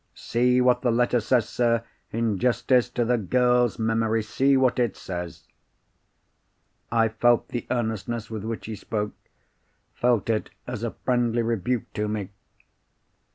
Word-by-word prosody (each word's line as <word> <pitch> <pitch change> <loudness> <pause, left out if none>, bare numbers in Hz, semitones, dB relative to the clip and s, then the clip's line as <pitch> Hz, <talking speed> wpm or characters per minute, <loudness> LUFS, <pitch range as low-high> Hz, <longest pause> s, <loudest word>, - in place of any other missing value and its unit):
See 125 +1 +2
what 125 0 +3
the 125 - +1
letter 120 +1 +2
says, 115 0 +1
sir. 115 -1 +1 0.3
In 115 -3 -1
justice 125 +1 +2
to 120 -1 -1
the 120 0 +2
girl's 125 +2 +2
memory, 115 0 +1
see 135 +5 +2
what 130 -1 +2
it 120 -5 0
says." 90 -2 -6 1.5
I 115 -1 +3
felt 120 +2 +2
the 120 - -4
earnestness 115 -1 -2
with 110 -2 -6
which 115 0 -5
he 110 - -5
spoke—felt 105 +1 -4
it 110 - -1 0.2
as 125 -3 -5
a 115 - -1 0.2
friendly 120 -2 +1
rebuke 115 +1 -2
to 105 0 -1
me. 105 -3 -3
115 Hz, 140 wpm, -25 LUFS, 110-125 Hz, 1.5 s, what